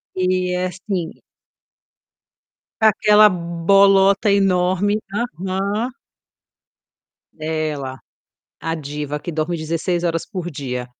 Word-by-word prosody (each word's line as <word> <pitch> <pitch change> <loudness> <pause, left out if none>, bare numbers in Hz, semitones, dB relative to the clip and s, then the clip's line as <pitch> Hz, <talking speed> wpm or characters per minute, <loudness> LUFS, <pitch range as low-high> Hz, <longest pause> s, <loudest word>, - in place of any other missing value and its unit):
E 185 0 0
é 180 0 -1
assim 185 -1 -5 1.6
aquela 215 0 +6 0.4
bolota 195 +1 +5
enorme. 195 +1 +2
Aham. 200 +2 -2 1.4
Dela, 155 -4 -3 0.6
a 165 - -2
diva 150 -1 -5
que 175 - -6
dorme 160 +2 -1
16 165 +2 -2
horas 165 -1 -1
por 180 -4 -5
dia. 125 -4 -5
180 Hz, 85 wpm, -20 LUFS, 155-195 Hz, 1.6 s, aquela